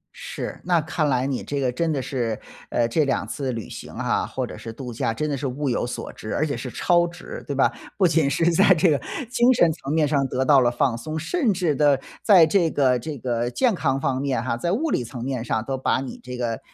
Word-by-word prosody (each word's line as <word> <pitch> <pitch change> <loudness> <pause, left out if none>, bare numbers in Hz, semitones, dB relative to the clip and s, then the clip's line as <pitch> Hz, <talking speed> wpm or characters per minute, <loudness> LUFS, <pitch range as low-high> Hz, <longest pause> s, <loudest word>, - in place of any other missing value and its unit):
是， - - -6
那 175 -2 +3
看 155 -1 -1
来 130 -1 +1
你 135 -2 -2
这 145 - -3
个 130 -2 +1
真 165 +6 -1
的 145 - 0
是， 120 -5 -2 0.3
呃， 120 -1 +1
这 155 +7 +2
2 135 -2 -1
次 135 -3 -3
旅 115 -2 -5
行 - - -9
啊， - - -1
或 - - -3
者 - - -9
是 115 - -8
度 120 +1 -7
假 115 0 -1
真 150 +7 -2
的 145 - -1
是 135 +1 -3
物 135 +2 -2
有 120 0 0
所 - - -6
值， 110 - -6
而 155 - +1
且 145 -3 -2
是 125 +2 -5
超 175 +7 +2
值， 175 +1 -9
对 140 - -3
吧？ 135 - +3 0.3
不 190 -2 +5
仅 160 -4 +2
是 165 +5 +2
在 190 +3 +6
这 170 0 +3
个 145 - +1 0.3
精 245 0 +4
神 170 -8 +4
层 140 -3 -6
面 155 -1 +3
上 140 -1 +1
得 130 +1 -1
到 135 -1 +6
了 120 - +4
放 120 0 +1
松， 155 +6 -5
甚 235 - 0
至 175 -6 0
地 140 -1 +4 0.2
在 190 -6 +7
这 170 0 +2
个 130 -5 +2
这 145 +4 -6
个 120 -1 -1
健 250 - +2
康 135 -7 0
方 135 -2 -1
面 135 -4 0
哈， 120 -2 -1
在 170 +9 -2
物 290 - 0
理 - - +1
层 120 0 -7
面 130 -2 -2
上 110 -1 -1
都 135 -1 -3
把 130 - +1
你 135 - -6
这 125 0 -7
个， 115 -2 -2
140 Hz, 270 characters per minute, -23 LUFS, 125-160 Hz, 0.3 s, 在